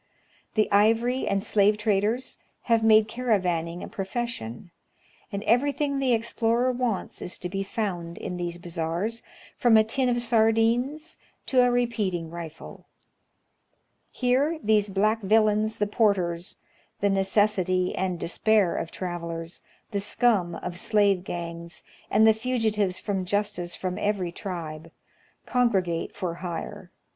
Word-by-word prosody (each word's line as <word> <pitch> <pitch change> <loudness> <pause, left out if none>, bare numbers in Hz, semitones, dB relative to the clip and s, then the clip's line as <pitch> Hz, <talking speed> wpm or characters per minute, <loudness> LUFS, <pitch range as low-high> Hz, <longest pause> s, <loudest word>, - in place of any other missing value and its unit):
The 215 -1 +3
ivory 225 +5 +3
and 195 -1 0
slave 210 -1 +3
traders 215 +4 0 0.2
have 230 -2 +2
made 215 -1 +6
caravann 200 -9 0
ing 170 +1 -7
a - - -6
pi'ofession, 195 - -5 0.6
and 200 +1 -4
every 250 +7 +3
thing 280 -1 -1
the 260 -2 +2
explorer 235 +2 +1
wants 245 -5 -2
is 180 - -4
to 180 - -5
be 195 +2 -3
found 185 -5 -3
in 180 - -5
these 175 -1 -3
bazaars, 175 +6 -3 0.4
from 235 -3 +5
a 220 - +6
tin 250 +4 0
of 240 0 +1
sardines 235 +7 +1 0.3
to 255 -2 +3
a 245 - +4
repeating 210 -9 -1
rifle. 170 -2 -9 1.2
Here 265 +6 +1
these 210 -1 +3
black 215 +3 +1
villains 215 +1 +2
the 210 - +1
porters 190 -5 0 0.2
— - - -37
the 200 - +3
necessity 190 -2 +2
and 185 -2 -2
despair 195 +1 +2
of 165 - -3
travelers, 170 -2 -5 0.3
the 200 - -1
scum 205 -4 +1
of 175 0 -5
slave 200 -4 +2
gangs, 170 -1 -6 0.3
and 215 +1 +4
the 220 - +7
fugitives 220 -5 0
from 195 -3 -2
justice 190 -2 -1
from 185 -1 -4
every 200 -4 -1
tribe 165 -4 -6 0.3
— - - -36
congregate 195 -10 0
for 180 -4 -3
hire. 175 -2 -6
205 Hz, 140 wpm, -26 LUFS, 180-230 Hz, 1.2 s, the